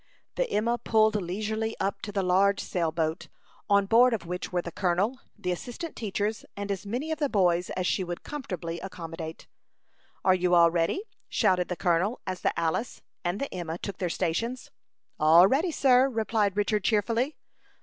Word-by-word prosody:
The - - -1
Emma 235 - 0
pulled 220 -1 +3
leisurely 215 +4 -2
up 200 +1 -1
to 205 - -5
the 195 -1 -1
large 195 +2 +3
sail 170 -3 -1
boat, 160 +1 -2 0.4
on 200 -1 +4
board 235 +3 +5
of 210 - -7
which 180 +1 -5
were 175 -1 0
the 170 - -6
colonel, 195 +8 0 0.2
the 195 -3 -2
assistant 250 - -5
teachers, 210 0 -2
and 200 0 -3
as 200 +1 -4
many 255 +9 -3
of 315 - -2
the 290 -2 +1
boys 180 -5 +2
as 185 - -1
she 190 - +1
would 175 -1 -6
comfortably 180 - -5
accommodate. 165 -3 -7 0.8
"Are 185 - +6
you 180 -1 +2
all 170 -1 +6
ready?" 170 - 0 0.3
shouted 180 -1 +2
the 180 - -3
colonel, 180 +6 +1
as 185 -1 -4
the - - 0
Alice 170 +8 -2 0.2
and 175 +3 -1
the 280 - -4
Emma 170 -2 -4
took 200 +1 -6
their 180 - -1
stations. 230 +10 -2 0.5
"All 160 +4 +7
ready, 285 - +2
sir," 265 -4 +4
replied 220 -4 0
Richard, 210 0 +1
cheerfully. 230 +6 +1
195 Hz, 180 wpm, -27 LUFS, 175-225 Hz, 0.8 s, All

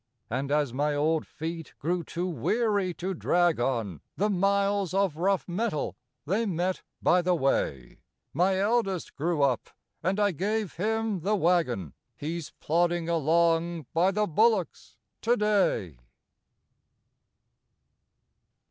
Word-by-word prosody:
And 135 +3 -2
as 145 -4 +1
my 145 +2 0
old 155 +2 +1
feet 165 0 -6
grew 175 +3 -1
too 175 +3 -4
weary 200 +2 0
to 190 +2 -3
drag 175 -2 +2
on 115 - -1 0.2
The 210 +2 +1
miles 200 0 +1
of 195 -5 +2
rough 190 +3 0
metal 185 -3 -2 0.3
they 210 +8 0
met 180 0 -1 0.2
by 180 - +4
the 180 0 +2
way, 70 - -1 0.3
My 185 +5 +2
eldest 200 -3 0
grew 155 0 0
up 130 -4 +1 0.3
and 190 +3 0
I 205 -1 +3
gave 205 +3 -2
him 220 +1 0
the 200 +6 +1
waggon 165 - +1 0.2
He's 160 +1 -4
plodding 170 +1 +1
along 165 0 +2
by 175 +3 +3
the 210 +2 +1
bullocks 210 +1 +1 0.2
to 240 +2 +2
day. 195 - +1
175 Hz, 125 wpm, -28 LUFS, 155-200 Hz, 0.3 s, by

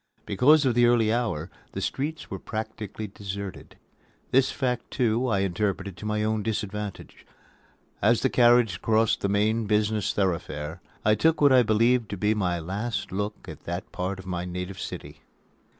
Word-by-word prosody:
Because 140 +9 +4
of 130 - +3
the 120 0 +5
early 115 -2 +3
hour, 95 -9 -2 0.2
the - - -3
streets 150 +2 -3
were 95 - -4
practically 110 -1 -5
deserted. 100 -1 -7 0.5
This 135 +1 +4
fact, 125 -3 -2
too, 120 0 +1
I 100 -5 +1
interpreted 100 0 -1
to 105 - -6
my 105 0 0
own 110 0 0
disadvantage. 105 -1 -4 0.8
As 115 +2 +4
the 130 - +3
carriage 120 -5 +4
crossed 110 0 +2
the 100 - 0
main 105 +2 +1
business 105 -1 +1
thoroughfare, 85 -4 -2 0.2
I 105 - +5
took 160 +9 +2
what 145 -2 +6
I 130 - +7
believed 115 +1 +2
to 100 - -4
be 105 +3 +2
my 90 -5 0
last 100 +8 -3
look 105 +2 -4
at - - -10
that 85 +2 -5
part 95 +1 -3
of 95 - -10
my 90 -2 -3
native 90 +1 -5
city. - - -7
105 Hz, 165 wpm, -26 LUFS, 95-120 Hz, 0.8 s, I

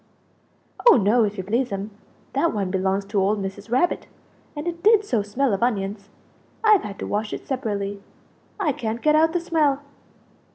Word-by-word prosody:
"Oh - - +8
no, 220 +2 +3
if 210 0 -4
you 190 - -3
please'm; 210 -1 -2 0.4
that 335 -8 +1
one 195 -3 -1
belongs 190 +1 0
to 200 0 0
old 205 +2 +1
Mrs. 195 +3 -6
Rabbit; 260 +9 +1 0.5
and 295 +3 -5
it 340 -1 -4
did 425 +1 +5
so 235 - +1
smell 220 +4 0
of 195 - -1
onions! 200 -3 -1 0.5
I've 430 -3 +6
had 200 -1 -7
to - - -5
wash 210 +1 -2
it - - -6
separately, 205 -6 -3 0.6
I 345 -7 +1
can't 230 -2 -4
get 305 - +4
out 320 +1 +4
the 350 - 0
smell." 305 -5 +1
220 Hz, 175 wpm, -23 LUFS, 200-295 Hz, 0.6 s, Oh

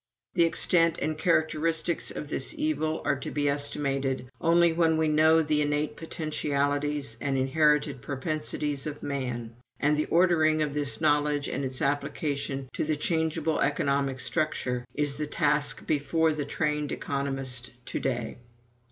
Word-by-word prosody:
The 170 -2 +4
extent 165 0 +3
and 155 0 -1
characteristics 160 +1 +1
of 150 - -4
this 155 - -1
evil 295 - -1
are - - +1
to - - -5
be 145 -1 -1
estimated 140 -2 0
only 170 0 +4
when 160 -1 +2
we 160 0 +2
know 160 +1 +4
the 150 0 +1
innate 145 +1 0
potentialities 145 -4 -1
and 135 -2 0
inherited 150 0 +2
propensities 150 +1 -3
of 150 -1 -7
man; 125 -5 -4 0.3
and 150 +1 +2
the 150 - 0
ordering 160 -3 +3
of 145 -2 -3
this 140 -7 0
knowledge 145 -1 +2
and - - -3
its 130 -1 -3
application 140 -1 -2
to - - -2
the 155 0 0
changeable 160 0 0
economic 140 -2 0
structure 130 -3 -1
is 145 -1 0
the 150 0 -3
task 150 -1 +1
before 160 +2 +1
the 150 -2 -3
trained 150 0 -1
economist 135 -3 -2 0.2
to - - -3
day." 120 -4 -3
150 Hz, 145 wpm, -27 LUFS, 140-155 Hz, 0.3 s, The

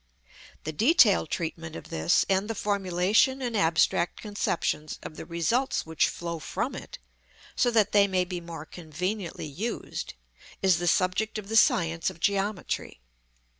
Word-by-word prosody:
The 155 - -3
detailed 215 - +4
treatment 165 0 -4
of - - -9
this, 80 +1 +2
and 195 +2 +1
the 225 - -2
formulation 200 +5 +2
in 245 -3 -3
abstract 170 -2 +2
conceptions 175 -7 -2
of 155 - -8
the 160 - -8
results 180 - 0
which 160 0 +1
flow 170 -1 -5
from - - -3
it, - - -8 0.6
so 245 - +3
that 225 -4 +3
they 200 -1 +5
may 185 -2 +1
be 180 -1 -5
more 165 -2 -8
conveniently 175 +3 -4
used, 190 +11 -5 0.4
is 185 -3 +3
the 175 - -2
subject 185 +6 +1
of 210 -1 -7
the 225 - -2
science 165 -6 +3
of - - -12
geometry. 200 - -1
180 Hz, 150 wpm, -27 LUFS, 165-210 Hz, 0.6 s, they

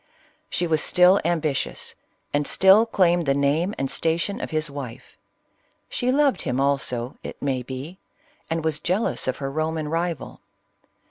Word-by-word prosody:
She 175 - 0
was 160 -2 +1
still 180 +2 +5
ambitious, 160 -5 -1 0.4
and 145 0 +1
still 195 +4 +5
claimed 175 -6 +2
the 135 - +3
name 150 +8 +1
and 135 - -1
station 165 +5 -1
of - - -4
his 155 0 0
wife: 140 -5 -8 0.7
she 250 +1 0
loved 280 0 +2
him 130 -4 -2
also, 135 -3 0
it - - -8
may 135 -2 -1
be, 130 +9 -7 0.5
and 165 -1 -2
was 155 -2 0
jealous 185 - 0
of 130 - -1
her 135 -1 -4
Roman 155 0 -2
rival. 165 0 -3
160 Hz, 150 wpm, -24 LUFS, 140-175 Hz, 0.7 s, still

